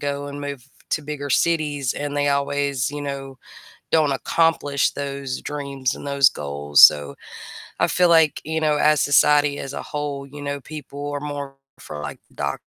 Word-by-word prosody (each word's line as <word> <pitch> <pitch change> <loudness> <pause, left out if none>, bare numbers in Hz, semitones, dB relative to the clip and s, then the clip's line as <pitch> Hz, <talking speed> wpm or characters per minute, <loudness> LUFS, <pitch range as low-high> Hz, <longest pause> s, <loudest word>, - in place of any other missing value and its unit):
go 145 0 -3
and 145 0 -7
move 140 -3 -6 0.3
to 155 - 0
bigger 145 -1 -5
cities 150 -4 +1
and 145 0 -4
they 145 0 +1
always, 140 -1 0
you 145 0 -6
know, 135 -1 -6 0.6
don't 155 -3 +3
accomplish 145 -1 +1
those 140 -2 -5
dreams 140 -3 -3
and - - -9
those 140 -2 +5
goals, 70 0 0
so, 70 -1 +7 0.6
I - - +3
feel 180 -1 +3
like, 160 -3 +4
you 160 +1 -2
know, 155 -1 +2
as 150 -1 +4
society 145 0 +4
as 135 - -6
a - - -5
whole, 145 -2 -5
you 145 +1 -11
know, 140 0 -3
people 145 -1 -7
are 145 - -3
more 145 -1 -6 0.2
for 75 - -8
like 75 -1 -6 0.2
doctors - - -3
145 Hz, 175 wpm, -22 LUFS, 140-145 Hz, 0.6 s, so